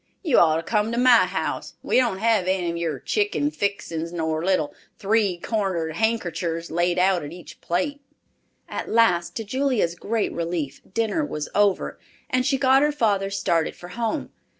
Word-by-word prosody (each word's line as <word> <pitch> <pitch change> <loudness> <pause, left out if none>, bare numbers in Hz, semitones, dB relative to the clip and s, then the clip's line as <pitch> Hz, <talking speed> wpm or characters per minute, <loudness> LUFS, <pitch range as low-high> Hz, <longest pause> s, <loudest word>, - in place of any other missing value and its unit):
You 305 -9 +4
ought 160 -2 +5
to 165 - -2
come 215 +2 0
to - - -2
my 240 -6 +6
house. 190 +1 -3
We - - +2
don't 240 -6 +2
have 220 -3 +2
any 175 -3 0
your 165 -4 -2
chicken 150 -1 0
fixin's 170 -2 -3
nor 160 -2 -2
little 185 -5 +1 0.2
three 205 -3 +1
cornered 175 -6 -2
hankerchers 175 -7 -1
laid 175 +2 +1
out 185 -1 +3
at 145 - -7
each 175 +1 -12
plate." 235 +12 -1 0.7
At - - -5
last, 200 -7 +3
to 225 - -3
Julia's 250 -5 0
great 215 +5 -2
relief, 165 -5 -3
dinner 230 - 0
was 150 - -4
over, 205 -2 +1 0.3
and 255 0 +1
she 270 - +2
got 265 0 +4
her 295 +1 +3
father 205 -8 +1
started 170 -4 0
for 175 - -11
home. 235 +9 -3
190 Hz, 170 wpm, -24 LUFS, 170-230 Hz, 0.7 s, my